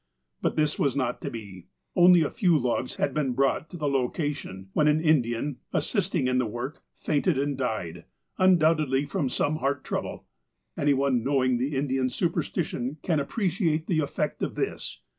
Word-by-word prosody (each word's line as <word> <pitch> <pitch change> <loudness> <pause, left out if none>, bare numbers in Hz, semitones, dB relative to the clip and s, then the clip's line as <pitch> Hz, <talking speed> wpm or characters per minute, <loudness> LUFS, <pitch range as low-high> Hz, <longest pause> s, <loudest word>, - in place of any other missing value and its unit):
But - - 0
this 150 -1 +1
was 140 -2 +1
not 130 -3 -1
to - - -3
be. 100 -6 -9 0.3
Only 180 -2 +7
a 150 - -2
few 180 -8 +3
logs 125 -1 -1
had - - -1
been 140 -4 0
brought 135 +5 +1
to 175 - -8
the 150 -3 -1
location, 135 - -2
when 150 - +3
an 150 +1 +4
Indian, 140 -4 +1 0.2
assisting 130 - 0
in 125 0 +2
the 125 - +1
work, 120 +7 -5
fainted 150 +1 0
and 140 +1 0
died, 90 -10 -3 0.3
undoubtedly 155 -6 +3
from 140 -1 -1
some 150 +4 0
heart 140 -2 -1
trouble. - - -4 0.5
Any 145 -1 +2
one 135 -3 +1
knowing 130 -2 +2
the 135 +3 -1
Indian 135 -2 0
superstition 150 -3 -2
can 165 -4 +1
appreciate 165 -1 0
the 165 -3 +1
effect 145 - -2
of - - -2
this. - - -4
140 Hz, 170 wpm, -27 LUFS, 125-155 Hz, 0.5 s, Only